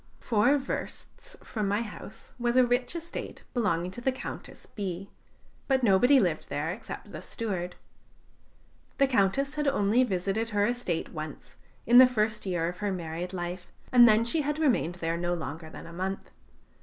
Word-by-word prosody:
Four 235 +5 +3
versts 485 - -6
from 215 -3 -3
my 205 +3 +1
house 220 0 -11
was 240 +1 +1
a 255 - +7
rich 245 +4 0
estate 335 0 -6
belonging 185 -7 0
to 240 - -8
the 265 - +2
Countess 260 - -8
B; 195 -1 -5 0.6
but 265 -2 +2
nobody 245 +6 +6
lived 175 -7 0
there 155 +3 -2
except 200 - -8
the - - -7
steward. 180 -6 -4 1.2
The 275 - +5
Countess 265 +3 +1
had 300 -1 -1
only 235 -2 +3
visited 200 +1 -1
her 205 -2 +2
estate 240 -8 -2
once, 155 -2 -8 0.3
in 240 +2 +8
the 255 - +10
first 215 -4 -1
year 175 -3 0
of 175 +1 -5
her 205 +1 -1
married 170 0 -4
life, 180 0 -5 0.2
and 240 -2 +8
then 220 +2 +4
she 310 +7 +2
had 295 +1 -1
remained 245 - +1
there 165 -2 -2
no 175 0 -1
longer 160 0 -6
than - - -10
a 170 - -10
month. 190 +2 -4
210 Hz, 170 wpm, -28 LUFS, 175-245 Hz, 1.2 s, the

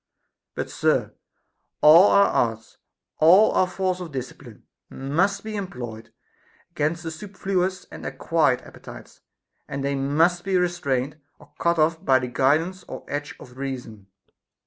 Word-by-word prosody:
But, - - -4
sir, - - 0 0.7
all 165 +6 +8
our 200 - +5
arts, 115 - -1 0.4
all 185 +7 +6
our 185 - +2
force 185 0 -2
of 175 -3 -7
discipline, 130 -3 -8 0.3
must 185 +9 -1
be 215 0 -6
employed 120 - -7 0.6
against 165 +1 -2
the 165 - -4
superfluous 185 0 -3
and - - -10
acquired 155 -7 0
appetites; - - -13 0.5
and 140 0 -5
they 140 0 -1
must 160 +6 +1
be 190 -1 +1
restrained 155 -6 -1 0.2
or 150 0 -20
cut 170 0 +1
off 160 +1 +1
by 130 -1 +4
the 130 -1 -3
guidance 155 +9 +1
or - - -8
edge 145 +1 -5
of 125 0 -14
reason. 125 -7 -6
155 Hz, 140 wpm, -24 LUFS, 135-180 Hz, 0.7 s, all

